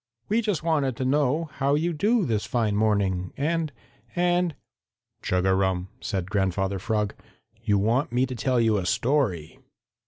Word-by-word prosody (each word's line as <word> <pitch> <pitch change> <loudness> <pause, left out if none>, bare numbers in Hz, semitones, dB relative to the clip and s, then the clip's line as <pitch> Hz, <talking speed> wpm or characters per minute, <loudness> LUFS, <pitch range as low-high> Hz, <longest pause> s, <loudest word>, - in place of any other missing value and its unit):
"We 220 +3 +2
just 205 -8 -1
wanted 145 -6 +1
to 130 - -2
know 145 +3 +1
how 140 +1 +1
you 170 +3 0
do 210 +6 +2
this 110 -6 -1
fine 110 -4 0
morning, 100 -4 +1
and 160 +1 0 0.4
and 175 -2 +1 0.3
" - - -57
"Chug 90 0 0
a 95 - +4
rum," 95 -1 0
said 95 -4 -3
Grandfather 95 -1 0
Frog, 105 0 -1 0.5
"you 105 -3 +2
want 115 +8 +1
me 125 +2 +2
to 130 - -6
tell 125 0 0
you 110 -2 +3
a 95 - -2
story." 115 - 0
120 Hz, 165 wpm, -25 LUFS, 100-150 Hz, 0.5 s, a